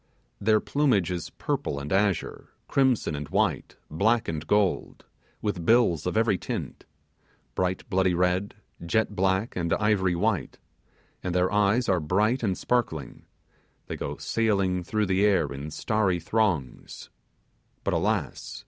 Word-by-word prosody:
Their 110 +1 +3
plumage 125 - +1
is 85 -3 -4
purple 70 - -3
and 70 +4 -4
azure, 100 -1 0 0.2
crimson 130 - +2
and 70 -1 -5
white, - - 0 0.2
black 110 +9 +2
and 80 -2 -4
gold; 105 -3 0 0.4
with 105 -5 -2
bills 105 - +3
of 90 - -1
every 110 -5 +2
tint: - - -5 0.7
bright 95 0 -2
bloody 95 -1 +2
red, 90 +3 0 0.3
jet 105 +4 0
black, 95 +4 0
and 85 -2 0
ivory 100 -4 +2
white, 100 +1 -1 0.6
and 90 -1 -3
their 90 0 +2
eyes 105 +4 +2
are 95 -2 +2
bright 105 - +1
and 95 -5 0
sparkling; 115 - -2 0.6
they - - -5
go - - -5
sailing 100 -5 0
through 105 +3 0
the 95 +1 +1
air 100 -3 +4
in 70 +2 -6
starry 95 +4 0
throngs; 90 - -2 0.7
but, - - 0
alas! - - -2
95 Hz, 140 wpm, -26 LUFS, 90-110 Hz, 0.7 s, air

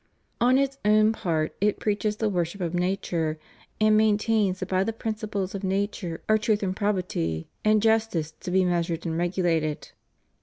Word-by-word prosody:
On 250 +2 +4
its 275 0 0
own 215 +1 +5
part, 160 -7 -1
it 210 0 +1
preaches 210 0 0
the 220 +1 -1
worship 180 -1 -2
of 175 -2 -2
nature, 175 -3 -1 0.4
and 215 0 +4
maintains 215 -2 +2
that 185 - -4
by 185 0 +2
the 225 - -1
principles 215 -3 -3
of 195 0 -5
nature 190 -3 -2
are 215 0 +4
truth 215 -1 +1
and 185 -1 -1
probity 180 - -2
and 215 0 +3
justice 220 -8 +1
to 170 - -9
be 185 +1 +3
meas 175 -1 +1
ured 165 0 -4
and 165 -1 -2
regulated. 170 -3 -1
195 Hz, 175 wpm, -26 LUFS, 175-215 Hz, 0.4 s, own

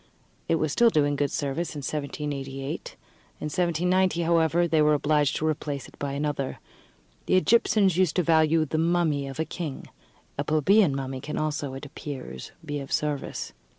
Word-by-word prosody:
It 165 - +4
was 155 -2 0
still 235 +8 +5
doing 145 -6 +2
good 145 0 0
service 155 +3 -2
in 145 - -5
1788; 140 -2 -4 0.4
in - - -5
1790, 175 +2 +1
however, 165 +1 +3
they 160 -2 +3
were 150 0 +4
obliged 150 -1 +2
to 155 - -1
replace 145 -3 -3
it - - -18
by 140 -1 -3
another. 140 -1 -2 0.7
The - - +3
Egyptians 195 -2 +3
used 185 -4 +2
to 180 - +2
value 160 -1 +4
the 155 +2 -2
mummy 165 -4 +1
of 135 -1 -7
the 160 - 0
king; 160 -6 -6 0.5
a - - +1
plebeian 155 +2 +3
mummy 135 -1 -4
can 150 +3 -5
also, 145 -3 -2
it 135 - -7
appears, 135 - -7
be 145 -1 -3
of 135 - -8
service. 150 -2 -2
150 Hz, 170 wpm, -26 LUFS, 140-165 Hz, 0.7 s, still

